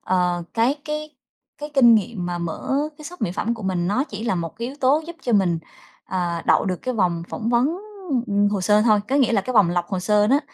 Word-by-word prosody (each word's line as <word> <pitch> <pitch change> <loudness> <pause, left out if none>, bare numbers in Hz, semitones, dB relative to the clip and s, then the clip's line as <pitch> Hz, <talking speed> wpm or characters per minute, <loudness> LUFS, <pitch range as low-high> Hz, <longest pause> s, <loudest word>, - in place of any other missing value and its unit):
ờ, 180 -1 0
cái 240 +6 +2
cái 305 -1 -5 0.4
cái 295 0 -6
kinh 240 -4 +7
nghiệm 200 -3 -1
mà 175 0 -3
mở 170 +10 -3 0.2
cái 305 - -11
shop 355 +2 -9
mỹ 200 - 0
phẩm 230 +4 -1
của 225 - -10
mình 180 -2 -1
nó 255 +7 +1
chỉ 215 -4 -7
là 195 - +1
một 165 -2 -4
cái 235 +2 -4
yếu 275 - -9
tố 285 +4 +3
giúp 340 - -8
cho 240 - -1
mình, 185 -5 +3 0.5
ờ, 175 -2 -2
đậu - - +4
được 185 -2 -1
cái 255 - -2
vòng 175 -5 0
phỏng 225 - -4
vấn, 260 +9 +2 0.5
ừm, 205 0 +2
hồ 205 -2 -1
sơ 210 +3 +4
thôi. 215 -3 +4
Có 270 - +1
nghĩa 255 -4 +3
là 205 - +3
cái 255 +5 -5
vòng 195 -5 +5
lọc 175 -1 -1
hồ 190 -2 -2
sơ 210 +2 +3
đó 275 +5 +3
210 Hz, 250 wpm, -22 LUFS, 180-255 Hz, 0.5 s, kinh